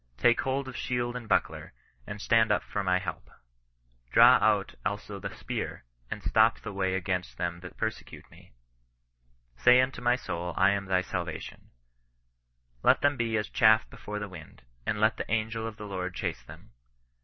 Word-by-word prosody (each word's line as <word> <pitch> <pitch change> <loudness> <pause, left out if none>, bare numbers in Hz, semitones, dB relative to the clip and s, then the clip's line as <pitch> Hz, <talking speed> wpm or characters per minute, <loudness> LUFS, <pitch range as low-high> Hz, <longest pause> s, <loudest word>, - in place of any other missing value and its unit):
Take 120 - +4
hold 135 +1 -2
of 130 - -8
shield 120 0 -2
and 120 -3 -7
buckler, - - 0 0.3
and 105 0 -6
stand 110 +1 +3
up 105 - +2
for 100 - -3
my 90 -1 +2
help. 95 - -6 0.8
Draw - - +7
out - - +2
also 100 +1 -4
the - - -5
spear, - - -5 0.2
and - - -6
stop 110 +1 +4
the 105 - -7
way 95 -1 0
Against 90 -1 -3
them 85 -1 -3
that 90 0 -11
persecute 110 0 -5
me: - - -18 1.1
say 125 - +6
unto 130 -1 0
my 120 0 +3
soul 90 -7 -5
I 100 - +5
am 100 -1 -1
thy 95 -1 +2
salvation - - -6 1.1
Let - - +4
them 145 0 +3
be 115 -3 0
as 105 - -2
chaff 110 -2 +4
before 105 0 -7
the 105 0 -4
wufed; 80 -9 -12 0.3
and 105 - 0
let 110 +1 +3
the - - -5
angel 110 +1 -1
of 110 -2 -8
the 105 - -8
Lord 95 -2 -4
chase - - -3
them. - - -14
105 Hz, 180 wpm, -28 LUFS, 95-115 Hz, 1.1 s, Draw